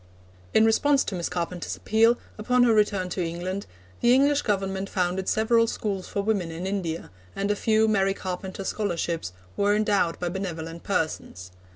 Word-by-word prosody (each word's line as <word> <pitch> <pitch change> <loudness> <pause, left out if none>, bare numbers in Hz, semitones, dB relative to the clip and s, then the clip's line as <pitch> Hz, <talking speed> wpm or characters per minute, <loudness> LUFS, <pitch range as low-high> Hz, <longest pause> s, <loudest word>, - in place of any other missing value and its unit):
In 220 - +6
response 275 +5 +3
to - - -5
Miss 175 -2 -2
Carpenter's 175 0 -3
appeal, 225 +2 +3 0.2
upon 250 +3 +3
her 235 -2 +5
return 205 -3 +2
to 180 0 -2
England, 175 +4 -4 0.3
the 240 +1 +5
English 285 +2 +4
Government 195 -2 -1
founded 185 0 -1
several 230 +1 +3
schools 200 -4 -3
for 200 - -2
women 200 -5 0
in 165 +3 -5
India, 180 - -3 0.2
and 200 +1 0
a - - +1
few 220 +1 +2
'Mary 195 -2 +2
Carpenter 190 +1 -5
Scholarships' 170 - -2 0.2
were 205 +1 +2
endowed 205 -5 +1
by 180 - -2
benevolent 170 -3 -5
persons. 155 - -3
195 Hz, 165 wpm, -26 LUFS, 180-220 Hz, 0.3 s, In